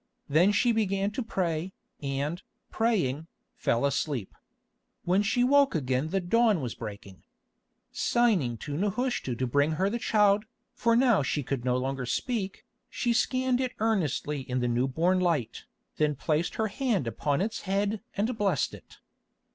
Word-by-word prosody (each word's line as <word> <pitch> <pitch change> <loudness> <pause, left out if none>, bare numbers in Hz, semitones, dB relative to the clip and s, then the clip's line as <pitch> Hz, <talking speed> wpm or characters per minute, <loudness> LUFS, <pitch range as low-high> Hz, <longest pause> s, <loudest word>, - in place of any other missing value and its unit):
Then 170 +8 +4
she 240 +3 +3
began 200 -2 0
to 235 - -3
pray, 185 -5 -2 0.3
and, 145 +4 -2 0.3
praying, 170 - 0 0.3
fell 115 +4 +1
asleep. 140 -5 -1 0.7
When 185 +3 +2
she 225 +4 +1
woke 280 -2 +4
again 130 -1 0
the 195 +3 0
dawn 215 +2 +3
was 125 -5 -4
breaking. 100 -4 -9 0.7
Signing 195 - +1
to 145 -1 -4
Nehushta 205 - -1
to 130 - -1
bring 145 +5 +2
her 190 +5 0
the 235 - -2
child, 210 -2 +3 0.3
for 230 -1 +2
now 240 - +4
she 145 +1 -1
could 130 -1 -3
no 125 0 +1
longer 130 0 -3
speak, 200 - -2 0.2
she 240 -2 0
scanned 255 +1 +1
it 255 -1 -2
earnestly 160 - 0
in 130 -1 -3
the 125 - 0
new 120 +2 +1
born 170 +7 +1
light, 165 -10 -1 0.3
then 150 -1 +1
placed 155 +4 -1
her 220 -1 0
hand 235 - 0
upon 140 +5 -1
its 220 +3 -2
head 200 +2 0 0.2
and 220 +5 0
blessed 205 -3 0
it. - - -13
180 Hz, 155 wpm, -28 LUFS, 140-220 Hz, 0.7 s, Then